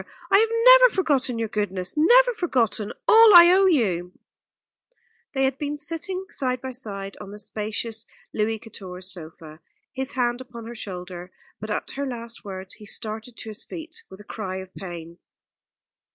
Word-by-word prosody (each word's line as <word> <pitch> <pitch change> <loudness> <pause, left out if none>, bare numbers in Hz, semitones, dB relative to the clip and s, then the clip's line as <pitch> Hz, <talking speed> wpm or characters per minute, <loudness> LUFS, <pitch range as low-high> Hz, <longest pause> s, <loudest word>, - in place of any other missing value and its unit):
I 395 - +7
have 445 +1 +3 0.2
never - - +8
forgotten 275 -9 +1
your 225 0 -1
goodness 195 -4 -3
never - - +5
forgotten 245 - 0 0.2
all 445 -3 +8
I 345 0 +10
owe 385 +1 +5
you." 185 - +1 1.2
They 270 - +1
had 265 0 0
been 295 0 -3
sitting 335 +5 -3
side 255 -2 -1
by 260 +1 -6
side 200 -6 -7
on 195 - -9
the 205 - -9
spacious 215 +2 -4 0.3
Louis 220 +1 0
Quatorze 190 -4 -8
sofa, 160 -2 -11 0.3
his 265 0 -4
hand 245 -1 0
upon 235 -3 -10
her 235 - -7
shoulder; 180 -4 -7 0.3
but 215 - -7
at 210 - -3
her 280 0 -4
last 235 -2 -7
words 190 -2 -7
he 215 - -12
started 220 +2 -3
to 220 - -6
his 215 - -3
feet 325 -1 -8
with 190 - -12
a - - -11
cry 200 -3 -6
of 190 0 -8
pain. 170 -2 -9
230 Hz, 165 wpm, -24 LUFS, 195-285 Hz, 1.2 s, I